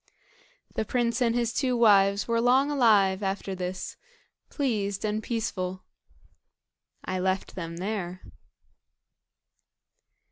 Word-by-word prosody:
The - - -1
prince 235 +1 0
and 235 -1 +2
his 235 -1 0
two 255 -2 0
wives 200 -3 +4
were 230 0 +1
long 260 +4 +3
alive 210 -8 +4
after 195 0 -2
this, 185 0 -5 0.5
pleased 210 - -1
and 215 +1 -1
peaceful. 190 -5 -3 1.2
I 185 0 -2
left 185 +1 -1
them 165 -2 -6
there. 185 -2 -4
210 Hz, 105 wpm, -27 LUFS, 190-235 Hz, 1.2 s, wives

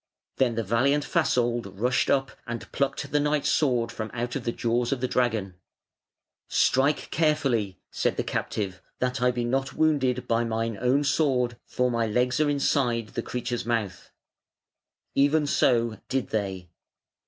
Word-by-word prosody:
Then 125 -3 +2
the 115 - -1
valiant 135 +8 +2
Fasold 120 -8 0
rushed 125 +2 +1
up 135 -1 +2 0.2
and 115 -3 -6
plucked 140 +1 -2
the 150 - +3
knight's 150 0 +1
sword 125 -6 +1
from 110 -1 -5
out 120 +1 -3
of 130 - -4
the 120 - +1
jaws 120 +1 0
of 135 - 0
the 130 - 0
dragon. 115 -7 0 0.9
"Strike 140 +3 +2
carefully", 135 - +1
said - - 0
the - - 0
captive, 95 -3 -3 0.2
"that 125 0 -1
I 125 - +4
be 120 -1 -1
not 135 +2 -1
wounded 130 -5 +1
by 115 0 +2
mine 115 -1 -2
own 130 +3 +3
sword, 135 -4 +1
for 125 0 0
my 115 -1 0
legs 125 +4 +1
are 155 -1 +3
inside 125 -5 +1
the 120 - -3
creature's 120 0 -3
mouth". 115 -5 -2 1.0
Even 145 +2 +3
so 115 -6 +2
did 135 -1 -1
they. 95 -5 -3
125 Hz, 155 wpm, -26 LUFS, 115-135 Hz, 1.0 s, I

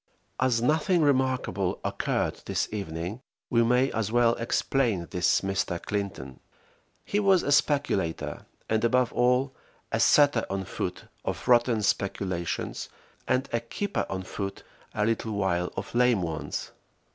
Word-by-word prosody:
As 125 -3 +2
nothing 160 +5 +3
remarkable 130 -9 +1
occurred - - -1
this - - 0
evening, 95 +2 -4 0.3
we 115 -2 +4
may 125 +3 +3
as 110 -1 -2
well 120 0 +4
explain 115 -4 0
this 90 -1 +2
Mr. 95 -2 -1
Clinton. 95 -12 -4 0.7
He 205 - 0
was 195 -3 +4
a 145 - -1
speculator, 140 - +1 0.2
and 110 0 +1
above 125 +1 +2
all 125 +2 +2 0.4
a - - 0
setter 145 -5 +5
on 95 -1 -2
foot - - -4 0.2
of - - -4
rotten 120 -3 +4
speculations, 95 -4 -2 0.4
and 130 +2 +1
a 115 - +2
keeper 190 - -3
on 95 -1 -3
foot 100 +1 -5 0.3
a 105 - +1
little 115 -1 -1
while 90 -3 0
of 95 - -5
lame 120 -5 +3
ones. 80 -2 -4
115 Hz, 135 wpm, -27 LUFS, 95-130 Hz, 0.7 s, setter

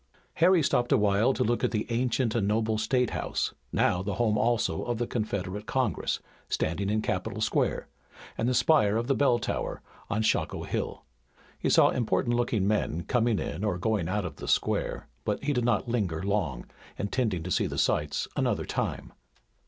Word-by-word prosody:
Harry 175 -1 +5
stopped 120 -2 +1
a 135 - +6
while 105 +3 +3
to 130 - 0
look 120 +1 0
at - - +3
the 110 -2 -1
ancient 120 -1 +1
and 105 -4 +1
noble 110 +1 +1
state 125 +1 +1
house, - - -2 0.2
now 90 - +2
the 100 0 -3
home 110 0 +2
also 120 +2 +1
of 120 -1 -2
the 120 - -1
Confederate 105 -3 -3
Congress, 130 -4 0 0.3
standing 85 +5 -1
in 110 +1 0
Capitol 100 +4 -2
Square, 110 - 0 0.5
and 120 - 0
the 130 - +1
spire 125 -5 +4
of 115 - -1
the 135 - +2
Bell 135 -3 +3
Tower, 110 - -3 0.3
on 105 +2 0
Shockoe - - 0
Hill. - - -4 0.5
He - - 0
saw - - +6
important 120 0 0
looking 115 -5 +1
men 95 -5 0
coming 120 -3 +1
in 80 +4 -4
or 105 -5 0
going 100 -3 0
out 105 0 -1
of 90 - -6
the - - -7
square, - - 0 0.2
but 105 +4 -2
he 145 +1 +1
did 125 -3 0
not 120 +1 +1
linger 95 -9 -1
long, 90 -12 -1 0.3
intending 100 -4 -1
to 90 - -5
see - - +2
the - - -5
sights - - 0
another - - 0
time. - - -3
110 Hz, 185 wpm, -28 LUFS, 100-120 Hz, 0.5 s, a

